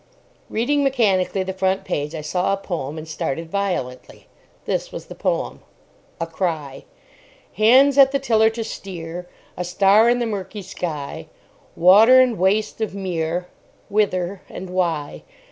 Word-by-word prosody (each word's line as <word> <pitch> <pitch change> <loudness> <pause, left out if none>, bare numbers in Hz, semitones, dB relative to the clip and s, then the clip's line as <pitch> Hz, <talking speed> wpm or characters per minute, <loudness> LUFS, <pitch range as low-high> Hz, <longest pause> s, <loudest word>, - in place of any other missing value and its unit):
Reading 285 +6 +1
mechanically 200 -8 +1
the 190 0 -4
front 190 0 0
page, 150 +2 -3
I 155 - -4
saw 180 +5 0
a - - 0
poem, 165 -6 -5
and 155 0 -7
started 160 +1 -4
violently. 175 -11 -3 0.4
This - - -2
was - - -7
the - - -10
poem:— - - -2 0.6
A 165 - -1
CRY 160 -5 -4 0.7
Hands 260 +7 +5
at 270 -1 +7
the 275 - +1
tiller 225 -5 +3
to 225 0 -5
steer: 180 -4 -7 0.3
A 180 - -3
star 195 +5 +4
in 245 - +3
the 240 - -1
murky 205 -1 -5
sky: 155 -6 -5 0.5
Water 210 +9 +7
and 250 -5 +3
waste 210 +4 +1
of 215 -2 -2
mere: 175 -2 -2 0.4
Whither 195 -2 0
and 185 -1 -8
why? 170 -5 -2
190 Hz, 145 wpm, -21 LUFS, 165-220 Hz, 0.7 s, at